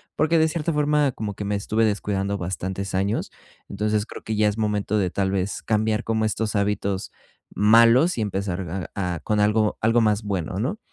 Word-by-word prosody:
porque 160 +1 +2
de 160 - +4
cierta 160 0 -2
forma, 150 -2 +2
como 105 -4 -5
que 105 - -5
me 105 - -1
estuve 110 +2 +1
descuidando 100 -1 -1
bastantes 95 +2 -4
años, 100 +3 -1 0.4
entonces 105 +2 -1
creo - - -10
que 110 - -3
ya 105 0 +3
es 105 +1 -1
momento 105 -1 0
de, 90 -3 0
tal 95 -1 0
vez, 95 0 -2
cambiar 110 +1 0
como 110 -1 0
estos 110 0 -2
hábitos 100 -1 -1 0.4
malos 115 - +5
y - - 0
empezar 95 -3 -3
a 90 -3 -1
a - - -6
con 105 -1 0
algo 105 0 +2
algo 115 +2 +3
más 105 -1 +1
bueno, 95 -4 -3
¿no? 150 - -2
105 Hz, 190 wpm, -23 LUFS, 100-115 Hz, 0.4 s, malos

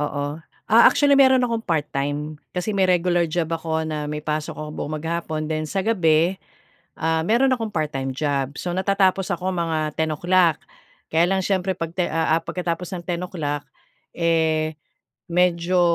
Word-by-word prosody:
Oo, 145 0 -3 0.3
ah 230 +2 +7
actually 285 -1 +5
mayro'n 260 -2 +6
akong 230 -2 -1
part-time 150 -1 -2 0.2
kasi 180 +4 -2
may 195 -2 +2
regular 175 -1 +2
job 160 0 -2
ako 160 -1 -1
na 155 -2 -3
may 150 0 -4
pasok 155 0 -3
ako 155 0 -6
buong 155 0 -5
maghapon 160 -1 -3
then 155 0 -1
sa 195 +4 -2
gabi, 175 -4 +2 0.6
ah, 160 0 +1
mayro'n 240 +6 +3
akong 225 -4 -2
part-time 135 -5 -2
job. 140 -1 -1
So 180 - -3
natatapos 190 0 +2
ako 185 +1 -3
mga 160 -3 -1
10:00 165 +1 +2 0.5
Kaya 165 +2 +4
lang 190 0 +1
siyempre 190 -1 0
pag 165 -2 -4
ti 180 -1 0
ah 160 0 +1
ah - - -11
pagkatapos 175 0 -3
ng 175 - -7
10:00 170 -5 -3 0.5
eh, 160 -2 +1 0.6
medyo, 180 +1 +2
165 Hz, 160 wpm, -22 LUFS, 155-185 Hz, 0.6 s, ah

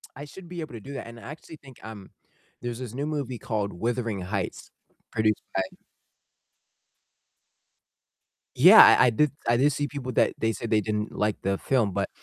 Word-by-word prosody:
I 145 - -8
should 175 +5 -12
be 175 -1 -6
able 155 -6 -8
to 115 - -7
do 140 +7 -10
that, 130 -4 -7
and 115 0 -11
I - - -15
actually 155 +1 -10
think, 135 -4 -17
um, 110 -3 -10 0.5
there's 120 0 -5
this 125 -3 -7
new 140 +3 -3
movie 140 -5 -3
called 105 -3 -3
Wuthering 115 0 -2
Heights 95 0 -5 0.4
produced 110 -1 0
by 95 - +2 2.9
Yeah, - - +9
I 125 - +7
I - - +5
did 145 +5 +1 0.2
I 120 0 +3
did 145 +3 +3
see 145 +2 -2
people 135 -3 -6
that - - +2
they 115 0 0
said 110 +2 -6
they 110 -1 +2
didn't 105 +1 -3
like 105 0 -1
the 95 0 -1
film, 120 -7 0
but, - - -2
120 Hz, 185 wpm, -26 LUFS, 105-140 Hz, 2.9 s, Yeah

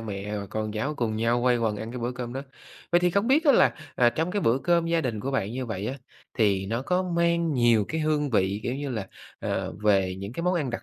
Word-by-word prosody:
mẹ 105 -1 -5
và 100 - -5
con 110 +1 -3
cháu 135 +8 -2
cùng 115 -5 -1
nhau 120 +2 +1
quây 125 -1 +3
quần 110 -2 0
ăn 110 +2 -6
cái 125 - -6
bữa 120 +2 -2
cơm 125 -1 -6
đó. 135 +1 -4 0.5
Vậy 175 - +5
thì 180 0 +3
không 200 +5 +1
biết 305 +5 +4
á 285 - +6
là, - - +4 0.2
à, 120 -1 +4
trong 160 +8 -1
cái 205 - -1
bữa 125 -5 +2
cơm 170 +2 +2
gia 165 0 +2
đình 115 -8 -2
của 135 - -3
bạn 110 -7 -1
như 130 0 -4
vậy 105 -2 -4
á, 130 - -2 0.4
thì 100 -3 +2
nó 115 +4 -2
có 180 +6 +1
mang 170 -2 +1
nhiều 120 -5 +3
cái 160 - -2
hương 150 -2 0
vị, 100 -1 +1
kiểu 125 - -2
như 140 0 -4
là, 110 -6 -3 0.3
ờ, - - -2
về 95 -3 +3
những 100 +3 -6
cái 170 - -4
món 180 +1 +1
ăn 150 -8 -1
đặc 120 - -5
120 Hz, 270 wpm, -26 LUFS, 110-160 Hz, 0.5 s, á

